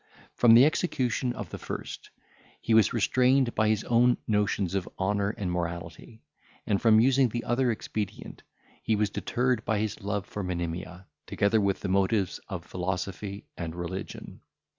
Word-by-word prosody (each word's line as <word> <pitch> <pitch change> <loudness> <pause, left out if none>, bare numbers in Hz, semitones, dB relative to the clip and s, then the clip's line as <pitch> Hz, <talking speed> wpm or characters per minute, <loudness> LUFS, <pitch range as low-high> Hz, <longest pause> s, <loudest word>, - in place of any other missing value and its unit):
From 115 -2 +6
the 125 +3 +8
execution 130 -6 0
of - - -7
the - - -6
first - - -7 0.5
he 115 - -1
was 110 -1 +5
restrained 125 +2 +2
by 110 - +2
his 110 -1 +1
own 120 +1 +3
notions 105 -3 0
of 95 -2 -2
honour 100 +1 0
and 95 -3 -2
morality; 85 +5 -5 0.4
and, 100 -2 0
from 110 -2 +6
using 130 +1 +4
the 120 +2 -4
other 125 +2 +1
expedient, 105 -2 -5 0.4
he 110 - +1
was 105 -1 0
deterred 125 +3 -1
by 110 - 0
his 110 +1 -3
love 100 0 -2
for 105 - -6
Monimia, 90 0 -4 0.2
together 105 +2 +2
with 100 -1 0
the - - -3
motives 95 0 +1
of 90 -4 -5
philosophy 95 +3 -4
and 85 -1 -5
religion. 90 +2 -7
105 Hz, 160 wpm, -28 LUFS, 95-115 Hz, 0.5 s, the